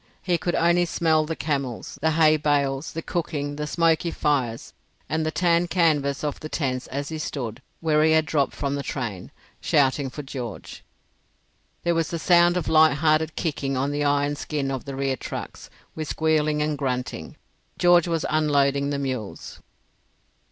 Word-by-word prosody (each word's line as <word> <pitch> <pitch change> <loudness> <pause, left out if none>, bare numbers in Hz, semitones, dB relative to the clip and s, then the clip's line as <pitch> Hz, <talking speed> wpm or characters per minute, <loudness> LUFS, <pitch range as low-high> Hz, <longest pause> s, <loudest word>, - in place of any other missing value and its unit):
He 175 -2 +1
could 175 - -1
only 175 +1 +3
smell 160 -2 +1
the 160 - -3
camels, 140 -7 -3
the 160 - +3
hay 155 -1 +5
bales, 145 -1 0
the 165 - -5
cooking, 145 -4 -3
the 150 0 -3
smoky 165 +1 +2
fires, 130 -8 -1 0.3
and 160 +2 -1
the 155 - 0
tanned 170 +1 +2
canvas 155 -5 +1
of 150 -2 -2
the 155 - -7
tents 130 -5 -2
as 140 +2 -4
he 160 -1 -5
stood, 120 -7 -4 0.2
where 155 -2 +3
he 160 0 +4
had 160 0 +3
dropped 150 -4 0
from 140 -1 -2
the 140 - -2
train, 115 -10 -5 0.3
shouting 135 -1 +2
for 150 +3 -7
George. 125 -6 -7 1.0
There 170 - +2
was 165 -1 -1
a 170 - -2
sound 175 +1 +4
of 175 - -2
light 155 -2 +5
hearted 155 +1 +1
kicking 140 -5 -2
on 135 +2 0
the 145 0 -1
iron 145 0 +1
skin 145 -2 -3
of 135 -2 -4
the 140 -1 -6
rear 135 0 0
trucks, - - -7 0.2
with 155 -1 -5
squealing 155 -1 +1
and 150 -1 -2
grunting. 125 -2 -3 0.4
George 175 -1 +5
was 165 -2 -1
unloading 140 -2 +2
the 145 - -1
mules. 130 -7 -5
150 Hz, 175 wpm, -24 LUFS, 140-160 Hz, 1.0 s, hay